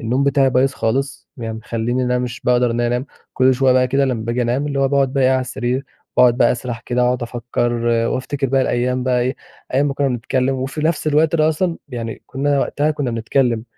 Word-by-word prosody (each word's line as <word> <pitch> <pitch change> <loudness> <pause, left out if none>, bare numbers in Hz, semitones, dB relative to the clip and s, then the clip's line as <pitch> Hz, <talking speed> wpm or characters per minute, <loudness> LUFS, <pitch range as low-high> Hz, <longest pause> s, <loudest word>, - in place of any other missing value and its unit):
النوم 125 +5 0
بتاعي 135 -1 +3
بايظ 130 +2 +2
خالص، 135 +4 -2
يعني 115 -3 -5
مخلّيني 115 +3 -2
أنا 125 0 +1
مش 125 -1 -4
باقدر 125 -1 +2
إن 120 +1 -1
أنا 120 - +1
أنام. 125 +3 -1 0.3
كل 130 0 +4
شوية 130 0 +3
بقى 130 0 +3
كده 135 +2 +2
لمّا 120 -5 -2
باجي 120 +2 -1
أنام 125 +5 0
اللي 140 -1 -1
هو 135 - +3
باقعد 135 -1 +1
بقي 135 -2 +2
إيه، 130 - +4
على 130 0 +2
السرير، 125 +1 -2 0.3
باقعد 120 -1 +5
بقى 120 - +4
أسرّح 120 -2 -5
كده 125 +1 -1
واقعد 125 0 0
أفكّر، 120 0 -2 0.4
وافتكر 135 +1 -2
بقى 135 +1 +2
الأيام 125 +1 0
بقى 125 -1 +2
إيه، 130 +2 -1 0.4
أيام 140 +2 +3
ما 140 - -3
كُنّا 140 -1 +1
بنتكلّم 130 +2 -1
وفي 135 +4 -4
نفس 155 -1 0
الوقت 155 +2 +3
ده 155 -1 +3
أصلًا 165 +2 0
يعني 115 -4 -6
كُنّا 140 +1 0
وقتها 150 +2 0
كُنّا 145 -4 -2
بنتكلّم. 115 0 0
130 Hz, 220 wpm, -19 LUFS, 120-135 Hz, 0.4 s, باقعد